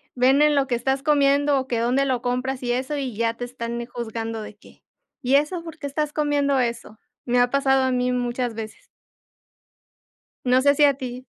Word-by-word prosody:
ven 265 +3 +4
en 300 -1 +4
lo 275 - +3
que 250 - 0
estás 265 +3 -1
comiendo 285 -1 +3
o 260 - -5
que 240 -3 -1
dónde 250 +4 +1
lo 255 -3 -1
compras 255 +1 -2
y 245 - -1
eso, 260 +4 -2
y 265 -5 -4
ya 230 0 +1
te 230 - -7
están, 235 -1 -5
eh, - - -5
juzgando 225 -2 -5
de 210 -1 -9
que: 210 - -20 0.4
"¿Y 255 +1 +2
eso 300 +5 +1
por 325 -1 -9
qué 285 - -5
estás 295 +1 -2
comiendo 290 -2 +1
eso?". 235 -3 -3 0.3
Me 245 0 +2
ha 245 - +3
pasado 270 -1 +2
a 260 - +1
mí 250 0 0
muchas 245 -1 -2
veces. 220 -1 -8 1.6
No 255 +1 +4
sé 285 +1 +4
si 295 - +3
a 280 - +4
ti. 255 -1 -7
255 Hz, 210 wpm, -23 LUFS, 240-280 Hz, 1.6 s, ven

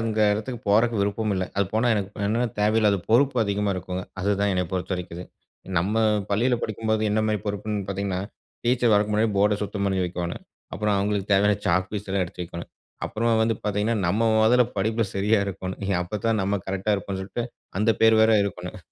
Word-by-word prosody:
அங்க 110 -1 -1
எடத்துக்கு 115 +3 -4
போறக்கு 115 +3 +3
விருப்பம் 105 +1 0
இல்ல. 95 0 -1
அது 100 - +3
போனா 110 +3 +2
எனக்கு 100 -2 -2 0.2
என்ன்னா, 115 +4 +1
தேவையில்லாத 105 -1 +3
பொறுப்பு 135 +3 +4
அதிகமா 100 0 0
இருக்குங்க 90 0 -4 0.2
அதுதான் 100 +1 +1
என்ன 90 0 +1
பொறுத்த 95 0 -2
வரைக்கு 90 -2 -6
அது. 90 - -6 0.5
நம்ம 95 +5 -1 0.4
பள்ளியில 120 +5 +2
படிக்கும்போது 110 0 -1
என்ன 110 - +2
மாரி 105 - +1
பொறுப்புன்னு 105 0 -2
பார்த்தீங்கன்னா, 100 -1 -2 0.5
டீச்சர் 120 -2 +3
வர்றதுக்கு 105 +1 +2
முன்னாடி 110 +1 +2
போர்ட 105 +1 +3
சுத்தம் 100 0 -3
பண்ணி 95 -1 0
வைக்கோனும். 90 -1 -4 0.3
அப்புறம் 105 -1 0
அவங்களுக்கு 100 0 -1
தேவையான 100 +1 +4
சாக் 90 +2 +2
பீஸலாம் 100 -2 -2
எடுத்து 90 +1 -7
வைக்கணும். 85 0 -8 0.4
அப்புறம் 115 0 +1
வந்து 115 0 +1
பார்த்தீங்கன்னா, 105 +2 0
நம்ம 100 +6 +1 0.2
மொதல்ல 120 +3 +5
படிப்ல 110 +3 0
சரியா 105 +3 +2
இருக்கணும். 95 -1 -5 0.2
அப்போதான் 105 +4 -1
நம்ம 100 +1 0
கரெக்ட்டா 95 +2 0
இருக்கனுன்ட்டு 100 +4 -4 0.3
அந்த 105 +2 +3
பேர் 110 0 +6
வேற 110 - +5
இருக்கணும். 90 +1 -6
105 Hz, 175 wpm, -24 LUFS, 95-110 Hz, 0.5 s, பேர்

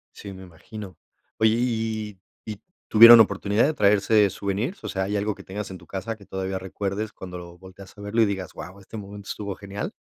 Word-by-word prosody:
Sí, 100 -1 -9
me 95 0 -11
imagino. 95 +2 -11 0.4
Oye, 110 0 +3
¿y 110 -4 -2 0.3
y 105 -2 -6 0.3
tuvieron 115 +2 +10
oportunidad 100 0 +3
de 155 - +1
traerse 105 -1 +3
souvenirs? 100 - -3
O - - -4
sea, 95 - -2
¿hay 100 +2 -2
algo 105 0 -1
que 100 - -13
tengas 100 +2 -6
en 95 - -7
tu 85 - -17
casa, 100 +4 -5
que 100 - -16
todavía 95 0 -4
recuerdes 100 +3 -4
cuando 90 -1 -8
lo 85 0 -11
volteas 95 +2 -14
a - - -11
verlo 105 +3 0
y - - +6
digas: 95 -3 -4
"Guau, 95 +2 -10
este 105 +3 -10
momento 100 0 -9
estuvo 100 -2 -5
genial?" 100 0 -6
100 Hz, 210 wpm, -24 LUFS, 95-110 Hz, 0.4 s, tuvieron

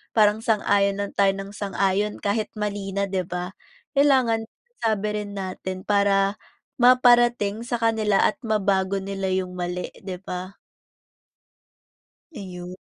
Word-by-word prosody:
parang 210 -1 +4
sang-ayon 200 -3 +2
lang 200 - -3
tayo 200 -1 +4
ng 195 0 -7
sang-ayon 200 0 -1
kahit 210 +1 0
mali 205 -1 -3
na, 200 0 +1
'di 190 -1 -1
ba? 180 +1 -4 0.4
Kailangan 260 -6 +3 0.3
masabi 215 -2 0 0.2
rin 205 - -9
natin 185 0 -5
para 200 -1 +3 0.4
maparating 240 -4 +4
sa 240 0 -2
kanila 220 -3 +2
at 210 - +2
mabago 195 -2 +1
nila 195 0 -4
yung 185 -1 -2
mali, 180 0 -3 0.2
di 185 -2 -4
ba? 185 0 -6 1.8
Ayun. 180 -3 -8
200 Hz, 125 wpm, -24 LUFS, 190-215 Hz, 1.8 s, parang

